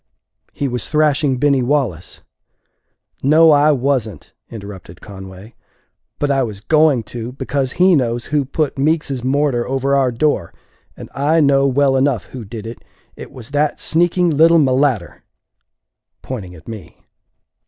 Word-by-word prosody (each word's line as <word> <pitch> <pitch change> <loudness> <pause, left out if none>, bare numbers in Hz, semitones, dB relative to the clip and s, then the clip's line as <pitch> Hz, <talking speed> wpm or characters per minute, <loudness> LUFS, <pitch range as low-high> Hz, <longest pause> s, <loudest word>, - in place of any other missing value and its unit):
"He 140 - -3
was 125 -1 -4
thrashing 150 -3 +1
Binny 140 0 +2
Wallace." 120 - -2 1.0
"No, 155 +4 +5
I 150 +1 +4
wasn't," 130 - -2 0.2
interrupted 100 -6 -10
Conway; 95 +1 -12 0.6
"but 145 -1 -1
I 135 -1 +1
was 110 -6 -4
going 150 +1 +2
to 120 +1 -6
because 135 0 -3
he 185 +1 +4
knows 120 -4 -1
who 145 -2 +2
put 140 +1 -3
Meeks's 140 -3 -1
mortar 135 -2 0
over 135 +1 0
our 135 -2 +2
door. 120 - -1 0.4
And - - -9
I 145 +4 +1
know 140 -2 +3
well 135 0 +2
enough 130 -5 +1
who 125 -3 -7
did 110 +1 -9
it; 115 +1 -9 0.3
it - - -10
was 125 -1 -11
that 145 +1 0
sneaking 175 +1 +1
little 165 +3 +5
mulatter!" 130 - +1 1.0
pointing 100 -9 -7
at 80 - -17
me. 110 -8 -11
135 Hz, 145 wpm, -18 LUFS, 115-145 Hz, 1.0 s, No